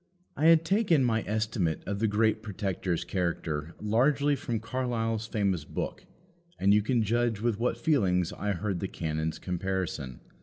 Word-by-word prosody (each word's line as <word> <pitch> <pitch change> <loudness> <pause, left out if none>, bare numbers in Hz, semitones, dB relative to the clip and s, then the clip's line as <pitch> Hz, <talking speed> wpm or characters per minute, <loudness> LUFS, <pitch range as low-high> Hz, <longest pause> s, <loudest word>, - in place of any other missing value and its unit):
I 150 - 0
had 165 0 +6
taken 190 - +3
my 115 -2 +2
estimate 105 -6 -1
of 100 0 -3
the 110 - +2
great 110 +1 +2
Protector's 95 -4 -2
character 85 -4 -2
largely 135 +7 +2
from 120 -4 -3
Carlyle's 115 -2 -2
famous 100 -7 0
book, - - -5 0.5
and 100 +1 +4
you 105 - +5
can 115 +2 +1
judge 115 0 +1
with 115 -1 0
what 125 - 0
feelings 95 - +1
I 105 0 -2
heard 95 0 -2
the 95 - -2
canon's 80 -2 -3
comparison. 90 -8 -3
105 Hz, 155 wpm, -29 LUFS, 90-120 Hz, 0.5 s, had